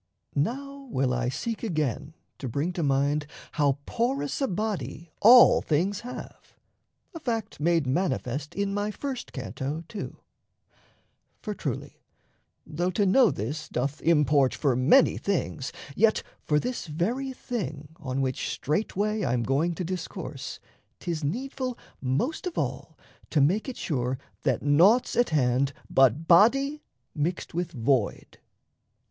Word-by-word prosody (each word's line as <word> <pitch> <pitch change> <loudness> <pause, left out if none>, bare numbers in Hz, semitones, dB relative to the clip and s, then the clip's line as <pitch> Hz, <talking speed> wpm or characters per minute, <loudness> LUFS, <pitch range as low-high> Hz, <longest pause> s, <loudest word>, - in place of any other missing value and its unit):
Now 275 - -2
will 130 - +1
I 125 0 0
seek 225 - -3
again 155 - -2 0.2
to 130 - -4
bring 145 +9 -1
to 175 - -2
mind 145 +1 +1 0.2
How 145 -3 +2
porous 260 +4 -1
a 270 - +2
body 175 - -3
all 240 +3 +8
things 180 +6 0
have 245 +1 -9 0.6
a 330 - -6
fact 225 -7 -3
Made 165 0 +2
manifest 140 -2 -1
in 200 0 -1
my 205 +1 -1
first 260 +3 -5
canto, 135 - -4
too. 210 0 -6 1.3
For, 210 - -3
truly, 140 - -5 0.6
though 175 +4 -1
to 200 +3 +1
know 230 +5 +5
this 145 +10 -4
doth 135 +4 -2
import 150 -4 +3
For 140 -5 +1
many 135 - +5
things, 160 -8 -2 0.2
yet 215 +2 +3 0.2
for 150 -1 +3
this 250 0 -3
very 225 - -1
thing 180 - -5
On 135 -2 -3
which 130 -1 -1
straightway 210 +6 -1
I'm 120 -5 +1
going 145 +8 +1
to 180 - -3
discourse, 185 +1 -5 0.4
'Tis 165 -3 -3
needful 255 - -3 0.2
most 140 - -1
of 355 - -5
all - - -3 0.3
to 155 - +2
make 185 - +2
it 255 - -7
sure 130 -4 -1 0.2
That - - 0
naught's 175 - +4
at 240 - +3
hand 135 -2 +2 0.2
but 135 +4 +4
body 275 - +5 0.3
mixed 165 +4 -2
with 175 +1 -2
void. 120 -3 0
165 Hz, 135 wpm, -27 LUFS, 140-220 Hz, 1.3 s, all